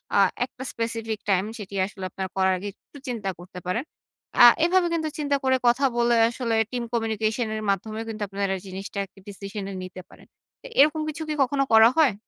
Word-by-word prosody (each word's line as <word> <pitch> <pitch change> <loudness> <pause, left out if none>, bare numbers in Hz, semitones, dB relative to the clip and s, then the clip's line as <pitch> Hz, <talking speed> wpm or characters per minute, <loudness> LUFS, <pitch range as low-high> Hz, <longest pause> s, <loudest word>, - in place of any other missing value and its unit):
আ - - +5 0.3
একটা 255 0 -10
specific 225 -1 -3
time 195 +1 +2
সেটি 200 -2 -8
আসলে 190 -1 -9
আপনার 190 +1 -4
করার 190 0 +3
আগে 195 +3 -6
একটু 285 - -18
চিন্তা 225 -6 -3
করতে 180 +1 -10
পারেন। 205 +8 0 0.6
আ - - +12 0.2
এভাবে 360 0 +3
কিন্তু 320 -2 -1
চিন্তা 285 -1 +1
করে 260 0 +3
কথা 245 +4 +4
বলে 240 0 +3
আসলে 235 -1 -2 0.2
team 245 -1 -2
communication 225 0 0
এর 215 - -4
মাধ্যমেও 215 +3 -1
কিন্তু 220 -1 -6
আপনারা 195 0 -1
জিনিসটা 195 +2 -6 0.3
decision 200 0 -6
এ - - -6
নিতে 185 0 -8
পারেন। - - -17 0.5
এরকম 300 +2 +5
কিছু 310 +1 -5
কি - - 0
কখনো 275 +1 +2
করা 220 +1 +9
হয়? 300 -8 +5
225 Hz, 185 wpm, -25 LUFS, 195-255 Hz, 0.6 s, আ